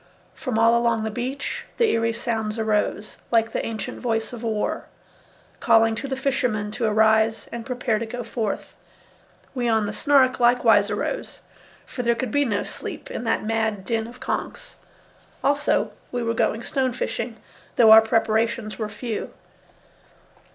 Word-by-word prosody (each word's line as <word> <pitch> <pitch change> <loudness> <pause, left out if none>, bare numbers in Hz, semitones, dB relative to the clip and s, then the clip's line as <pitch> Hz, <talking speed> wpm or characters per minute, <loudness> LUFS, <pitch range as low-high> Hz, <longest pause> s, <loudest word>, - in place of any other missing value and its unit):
From 255 -5 -3
all 230 +1 +5
along 235 -2 +2
the 220 - -2
beach 255 +5 -4
the 465 -2 +3
eerie 230 0 +1
sounds 225 -2 -3
arose, 215 -1 -1
like 225 -1 +2
the - - -2
ancient 220 -3 -5
voice 225 -2 -2
of 235 - -7
War, 220 -3 -2 0.7
calling 225 -1 +4
to 275 - -4
the 265 - -2
fishermen 250 -6 0
to 230 +2 -2
arise 220 0 +3
and 235 -1 -6
prepare 245 -4 0
to 230 - -4
go 245 +2 -5
forth. 225 -2 -4 0.8
We 245 -3 -1
on 220 -2 +2
the 205 - -4
Snark 270 -2 +3
likewise 245 +1 +4
arose, - - -4 0.4
for 250 - -5
there 235 -1 +2
could 250 -1 -3
be 285 +3 +2
no 205 -5 0
sleep - - -8
in - - -5
that - - 0
mad 220 -3 -1
din 225 0 -1
of 245 +1 -12
conches. - - -5 0.7
Also, 285 +1 +1 0.2
we 245 -1 -2
were 230 0 0
going 225 0 0
stone 260 -2 -1
fishing, 230 -1 -3 0.4
though 225 -2 +7
our 220 0 +11
preparations 225 0 0
were 215 -1 -2
few. 215 +1 -5
230 Hz, 160 wpm, -24 LUFS, 220-245 Hz, 0.8 s, our